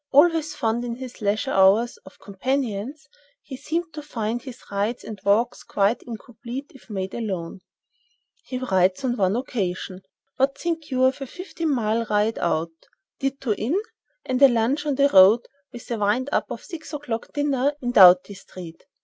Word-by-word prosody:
Always 315 +2 +4
fond, 225 +1 -1
in 235 -1 -4
his 255 -1 -9
leisure 215 +6 0
hours, 200 +5 +4
of 190 - -14
companions, 255 +5 -3 0.4
he 270 - -8
seemed 325 +5 -3
to 305 - -6
find 235 -5 -3
his 255 -2 -10
rides 205 +4 -1
and 215 -3 -8
walks 220 +4 +2
quite 205 +4 0
incomplete 245 +3 -8
if 265 - -18
made 190 -2 -4
alone. 190 -6 -4 0.9
He 255 - -4
writes 190 -4 +1
on 245 -1 0
one 195 -2 +1
occasion: 190 -6 -3 0.4
"What 275 +1 +1
think 325 -3 -3
you 255 -1 +1
of 260 +2 +2
a 270 - -4
fifteen 335 0 -5
mile 230 -4 0
ride 210 +1 +1
out, 160 +1 0 0.5
ditto 270 -4 -1
in, 250 - -1 0.5
and 255 0 -1
a 275 - +10
lunch 255 +5 0
on 285 - +1
the 280 +1 +4
road, 200 -1 +7 0.3
with 240 -1 -10
a 230 - -1
wind 250 +7 +1
up - - 0
of - - -6
six 335 -4 -9
o'clock 250 -6 -4
dinner 285 -1 +1
in 245 -3 -2
Doughty 185 -2 +7
Street?" 180 -4 -11
240 Hz, 170 wpm, -24 LUFS, 205-275 Hz, 0.9 s, a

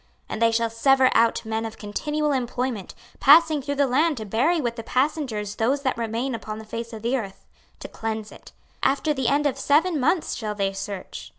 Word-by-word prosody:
26:039:014 - - -37 0.2
And 220 - -5
they 230 0 +5
shall 230 0 +1
sever 265 +3 +4
out 230 0 +2
men 220 0 -2
of 225 -1 -6
continual 295 +9 -2
employment, 250 -5 -2 0.2
passing 310 +1 +6
through 285 +1 -3
the 280 0 +3
land 295 +4 +2
to 220 - -5
bury 260 - +1
with 240 -5 -2
the 230 - -5
passengers 250 -5 -1
those 270 +5 +1
that 260 - 0
remain 235 +3 -2
upon 215 -2 -5
the 220 - -9
face 230 +2 -6
of 220 -2 -9
the 240 +3 +1
earth, 200 -7 -6 0.4
to - - -6
cleanse 220 -1 -5
it: - - -14 0.3
after 290 +3 +1
the 265 -4 -1
end 290 +1 +2
of 275 -2 0
seven 305 +4 +2
months 315 +6 +1
shall 215 -2 -4
they 195 -1 -1
search. 195 -1 -7
245 Hz, 210 wpm, -24 LUFS, 220-285 Hz, 0.4 s, passing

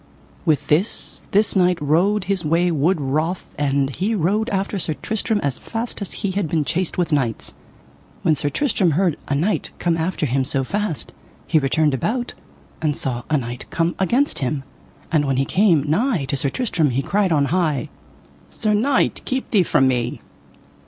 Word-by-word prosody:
With 150 -4 +2
this 170 +9 0
this 210 +2 +2
knight 180 -2 +3
rode 180 +8 +2
his 190 -1 -1
way 170 +3 +2
wood 165 +3 +2
wroth, 155 +6 -2
and 140 -1 +1
he 200 - -1
rode 210 +6 +1
after 195 0 -1
Sir 160 -3 -2
Tristram 220 +2 -1
as 140 -2 -1
fast 225 -1 -5
as 200 - -4
he 195 - +1
had 190 -4 -1
been 155 -2 +1
chased 170 +3 -1
with 175 -2 0
knights. 125 -6 -1 0.7
When 155 - +3
Sir 145 - -1
Tristram 190 - +1
heard 180 -5 +2
a 140 - 0
knight 180 +9 0
come 170 -1 +1
after 165 -1 -1
him 135 0 +1
so 135 0 0
fast 200 +1 -3 0.3
he 160 - +3
returned 150 +1 +2
about, 240 - -1 0.5
and 150 -2 0
saw 125 -2 -2
a 150 - +3
knight 120 -1 -5
coming 165 +1 0
against 245 +9 +1
him. 135 +1 -2 0.5
And 155 -3 +3
when 135 -2 0
he 135 - +2
came 180 -6 +3
nigh 185 - +1
to 140 - +1
Sir 140 0 0
Tristram 175 - 0
he 130 +2 0
cried 200 +1 +1
on 145 -3 +3
high: 160 -7 0 0.6
Sir 215 -1 -1
knight, 265 +7 +2
keep 260 0 -3
thee 205 - +5
from 135 -6 +3
me. 125 -2 -1
165 Hz, 180 wpm, -21 LUFS, 140-200 Hz, 0.7 s, thee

